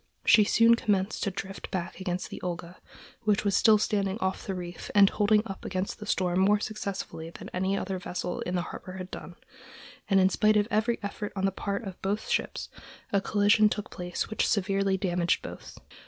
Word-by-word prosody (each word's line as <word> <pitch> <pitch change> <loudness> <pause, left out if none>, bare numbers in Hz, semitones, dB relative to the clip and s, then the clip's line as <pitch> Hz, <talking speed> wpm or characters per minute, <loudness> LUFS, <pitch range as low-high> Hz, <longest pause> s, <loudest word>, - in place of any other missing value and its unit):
She 215 - +7
soon 230 +2 +5
commenced 205 -3 0
to 200 - +1
drift 195 0 -6
back 180 -1 -4
against 185 -1 -3
the - - -7
Olga, 175 0 -5 0.4
which 210 -2 +1
was 200 -2 +2
still 220 0 +6
standing 200 -1 0
off 190 -3 -2
the 195 - -2
reef 175 -1 -7
and 200 -1 +8
holding 210 +1 +3
up 195 -3 -7
against 185 +1 -3
the 210 - -8
storm 180 -2 +1
more 205 +2 +4
successfully 200 -6 -5
than - - -10
any 190 +2 0
other 190 -1 -3
vessel 180 0 -4
in 180 - -3
the 175 - 0
harbor 185 - -8
had 185 0 -7
done, 175 - -8 0.7
and 195 -1 +5
in 185 0 +5
spite 215 +2 +3
of 205 0 +2
every 220 +2 +2
effort 205 +1 -4
on 195 0 0
the 195 - +2
part 200 +3 -3
of 195 -3 -8
both 205 +3 -2
ships - - -1 0.5
a 200 - +3
collision 210 +1 +4
took 210 -1 -4
place 180 -1 -3
which 220 - 0
severely 195 -1 +1
damaged 175 -3 0
both. - - -9
195 Hz, 200 wpm, -28 LUFS, 185-210 Hz, 0.7 s, and